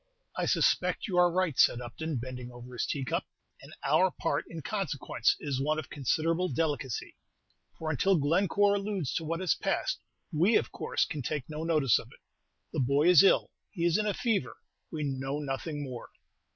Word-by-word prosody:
"I - - -1
suspect - - +2
you 185 -4 -2
are 175 -1 +5
right," 180 -5 0
said 120 - +5
Upton, 135 +5 -4
bending 125 0 -6
over 120 +1 -11
his 120 - -2
teacup; 135 -4 -2 0.3
"and - - -13
our 155 +7 +4
part, - - -2
in 165 -2 -7
consequence, 185 - 0
is 135 -3 -2
one 155 +2 +1
of 155 -1 -6
considerable 165 +6 0
delicacy; 145 -8 -2 0.6
for 160 -1 -2
until 190 +6 +3
Glencore 190 +7 +3
alludes 200 -8 -2
to - - -1
what 165 +3 -2
has 185 - +3
passed, - - -1 0.3
we 180 +9 +3
of - - +2
course, - - 0
can 150 - -5
take 145 +2 -2
no 155 +1 -4
notice 155 -7 +3
of - - -10
it. - - -17 0.5
The - - -1
boy 140 +5 +3
is 180 -4 +9
ill; 195 - +4 0.2
he 170 -4 -2
is 170 -1 +3
in 210 - 0
a 205 - +1
fever: 205 - -1 0.3
we 155 -2 -3
know 135 0 -2
nothing 145 +1 -4
more." 125 -4 -7
155 Hz, 185 wpm, -30 LUFS, 135-175 Hz, 0.6 s, is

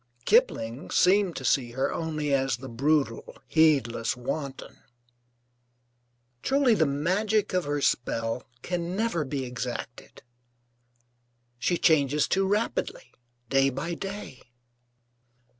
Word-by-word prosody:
Kipling 140 - +2
seemed 185 -1 +3
to - - -6
see 120 -4 +1
her 130 +2 -1
only 155 -3 -2
as 135 -3 +1
the 130 +2 -9
brutal, 135 0 0
heedless 135 -8 +2
wanton.) 135 +2 -5 1.6
Truly 270 -3 +3
the 160 -8 +3
magic 190 +9 0
of 180 -1 +1
her 145 0 -1
spell 115 -2 -1 0.2
can 175 0 -3
never 210 -7 0
be 135 -1 -3
exacted. 125 -1 -6 1.4
She 175 +8 +1
changes 150 -2 +3
too 195 0 +1
rapidly, 460 - -2 0.3
day 135 +2 +3
by 135 +6 -4
day. 195 -7 -7
150 Hz, 110 wpm, -27 LUFS, 130-185 Hz, 1.6 s, seemed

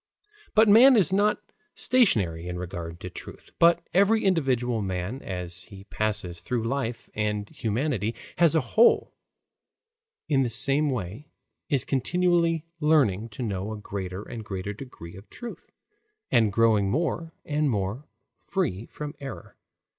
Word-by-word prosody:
But 220 +1 +6
man 240 +5 +8
is 190 -3 +4
not 205 +2 +2 0.3
stationary 95 - +2
in 90 0 -4
regard 85 -2 -6
to 90 - -6
truth, - - -11
but 170 0 +4
every 200 +4 +3
individual 125 - +1
man 95 +6 -3
as 90 -1 -6
he 100 -2 -12
passes 100 -5 -2
through 120 -3 -2
life, 120 -1 -3
and 105 -1 -2
humanity 115 -1 -2 0.2
as 170 -2 +5
a 160 - +4
whole 220 - +3 1.1
in 140 -4 +2
the 125 - +1
same 140 +6 +2
way, 120 - -4 0.4
is 140 -6 +2
continually 170 +2 +1
learning 130 - +2
to 115 +4 -6
know 100 -1 -3
a 110 - -5
greater 95 -2 -5
and 115 -2 -7
greater 100 0 -5
degree 105 -8 -10
of 95 +2 -13
truth, 240 -1 -9 0.6
and 110 -4 +4
growing 110 -2 +3
more 165 - -2
and 150 -1 0
more 105 +5 -3 0.4
free 95 +6 -2
from 150 0 -7
error. 135 -1 -8
120 Hz, 140 wpm, -26 LUFS, 100-155 Hz, 1.1 s, man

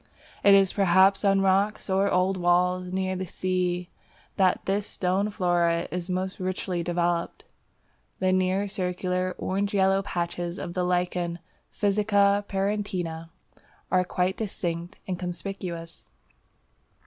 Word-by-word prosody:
It 200 -1 +8
is 195 -1 +4
perhaps 195 +1 +4
on 195 -1 +4
rocks 195 +2 +1
or 195 +1 +2
old 185 +1 +2
walls 180 0 +1
near 190 0 -1
the 185 0 -4
sea 180 0 -2 0.4
that 185 -2 +2
this 200 +1 0
stone 190 +3 0
flora 175 -4 +1
is 180 0 -4
most 185 +1 -2
richly 185 -1 -2
developed. 175 0 -1 0.7
The 185 0 +1
nearly 185 +2 +1
circular 185 -1 -2
orange 200 +2 -1
yellow 195 0 +3
patches 175 -2 -3
of 170 - -5
the 180 0 -1
Lichen 180 -1 -1 0.3
Physcia 205 0 +2
parietina 190 -5 -2 0.6
are 185 -1 +4
quite 180 +1 -1
distinct 175 -3 -4
and 180 -2 -3
conspicuous. 175 -2 -6
185 Hz, 125 wpm, -26 LUFS, 175-195 Hz, 0.7 s, It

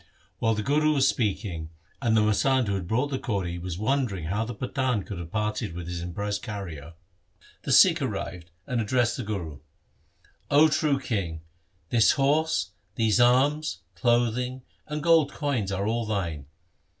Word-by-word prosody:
While 115 0 +2
the 105 - -2
Guru 155 +3 +2
was 135 -1 +4
speaking, 95 -9 -1 0.3
and 115 -3 +2
the - - +5
masand 125 +5 +2
who 100 - 0
had 95 -3 -3
brought 125 +8 0
the 135 - -1
kauri 90 -6 -2
was 85 -1 -5
wondering 110 - 0
how 100 +7 -1
the 115 0 -6
Pathan 125 -2 -1
could 100 -4 -6
have 85 -1 -8
parted 105 -6 -2
with 85 -1 -6
his 85 -1 -4
impressed 100 +4 -3
carrier, 85 - -7 0.7
the - - -4
Sikh - - +6
arrived 85 -1 -4 0.2
and 120 -2 -1
ad 110 - -4
dressed 120 -1 +1
the 125 - -3
Guru, 85 -9 -5 0.5
' - - -35
O 155 +1 +7
true 150 -2 +1
king, 95 -11 -3 0.5
this 115 -2 +4
horse, 140 - +1 0.2
these 115 0 +2
arms, 130 -3 +3
clothing, 120 +6 0 0.2
and 150 0 -4
gold 160 -3 +4
coins 130 -10 -1
are 100 +1 -1
all 115 +1 -1
thine. 85 -9 -3
110 Hz, 170 wpm, -26 LUFS, 95-130 Hz, 0.7 s, O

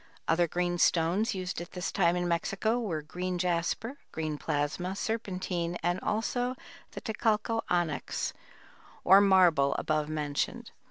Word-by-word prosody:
Other 170 +1 +3
green 175 +1 -1
stones 175 +8 +2
used 185 -2 -3
at 175 - -9
this 180 0 -3
time 175 -3 +3
in 175 0 0
Mexico 195 +7 0
were 170 -10 -2
green 180 +4 -3
jasper, 180 +9 -1
green 155 -1 -3
plasma, 150 +6 -1
serpentine 185 -6 -2
and 175 +2 +1
also 245 +5 -1 0.4
the - - -6
"Tecalco 220 0 0
onyx" 175 -4 -1 0.7
or 195 +2 +8
"marble" 180 -8 +5
above 155 -1 0
mentioned. 150 -2 -2
180 Hz, 130 wpm, -30 LUFS, 165-200 Hz, 0.7 s, or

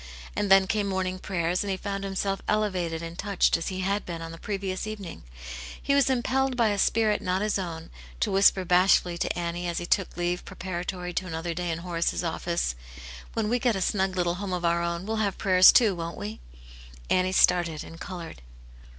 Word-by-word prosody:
And 205 - -1
then 195 0 +7
came 205 +1 0
morning 185 -1 -2
prayers, 180 -1 -1
and 200 - -4
he 190 - -1
found 195 0 -4
himself 195 0 -2
elevated 180 -6 0
and 165 +1 -8
touched 200 -3 +2
as 165 - -2
he 185 -1 -3
had 200 +2 0
been 170 -2 -6
on 165 0 -7
the 165 - -10
previous 195 -1 -3
evening. 205 -6 -7 0.6
He 280 - 0
was 280 -1 +4
impelled 260 +1 +1
by 230 -3 +4
a 205 -1 -1
spirit 215 +1 +2
not 185 +2 0
his 210 -1 0
own, 165 -3 -6 0.3
to - - +1
whisper 195 -1 +4
bashfully 180 -1 +3
to - - -1
Annie, 175 0 -3
as 170 - -2
he 175 - -3
took 185 +1 0
leave 175 0 -1
preparatory 180 0 -5
to 185 - -2
another 165 0 -3
day 175 +1 -3
in 165 - -1
Horace's 170 0 -1
office, 170 - -1 0.3
" 60 0 -13
When 225 -2 -1
we 245 +3 +1
get 240 -2 +2
a - - -1
snug 190 -1 0
little 175 -1 0
home 195 -2 -3
of 175 -1 -2
our 170 0 +2
own, 170 +1 -2
we'll 220 +1 -2
have 205 -3 0
prayers, 185 -2 +7
too, 225 -5 +5
won't 170 -1 -5
we 105 +2 -6 0.2
} - - -17
" - - -19
Annie 185 0 +3
started 175 -4 +3
and 165 - -11
coloured. 175 - -7
185 Hz, 215 wpm, -27 LUFS, 170-200 Hz, 0.6 s, then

